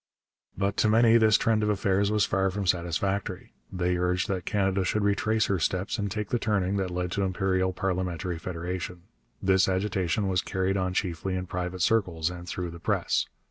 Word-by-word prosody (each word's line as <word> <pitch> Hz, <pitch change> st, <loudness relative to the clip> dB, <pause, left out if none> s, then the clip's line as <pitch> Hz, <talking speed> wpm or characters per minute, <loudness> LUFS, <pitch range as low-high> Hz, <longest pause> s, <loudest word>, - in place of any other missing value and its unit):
But 100 Hz, +1 st, -1 dB
to 110 Hz, -, +3 dB
many 115 Hz, +1 st, +6 dB
this 110 Hz, -2 st, +5 dB
trend 110 Hz, -1 st, +2 dB
of 105 Hz, -, +1 dB
affairs 100 Hz, -1 st, +1 dB
was 105 Hz, -1 st, +2 dB
far 95 Hz, 0 st, +1 dB
from 100 Hz, +1 st, -3 dB
satisfactory. 90 Hz, +3 st, -1 dB, 0.2 s
They 90 Hz, -1 st, 0 dB
urged 90 Hz, 0 st, 0 dB
that 95 Hz, -3 st, -2 dB
Canada 95 Hz, -2 st, +1 dB
should 105 Hz, +3 st, 0 dB
retrace 110 Hz, +2 st, +2 dB
her 95 Hz, -2 st, 0 dB
steps 95 Hz, +7 st, -1 dB
and 100 Hz, -1 st, -1 dB
take 105 Hz, +1 st, -4 dB
the 120 Hz, -, 0 dB
turning 100 Hz, -3 st, 0 dB
that 95 Hz, -2 st, -1 dB
led 90 Hz, 0 st, -3 dB
to 100 Hz, -, -1 dB
imperial 95 Hz, -1 st, +1 dB
parliamentary 90 Hz, -2 st, -2 dB
federation. 90 Hz, +1 st, -5 dB, 0.4 s
This 95 Hz, 0 st, +4 dB
agitation 95 Hz, 0 st, 0 dB
was 95 Hz, -1 st, +1 dB
carried 95 Hz, 0 st, -1 dB
on 95 Hz, -1 st, -1 dB
chiefly 95 Hz, 0 st, -1 dB
in 90 Hz, 0 st, -3 dB
private 90 Hz, 0 st, -3 dB
circles 90 Hz, -7 st, +1 dB
and 90 Hz, 0 st, -8 dB
through 90 Hz, -2 st, -4 dB
the 85 Hz, -, -10 dB
press. -, -, 0 dB
95 Hz, 185 wpm, -27 LUFS, 90-100 Hz, 0.4 s, many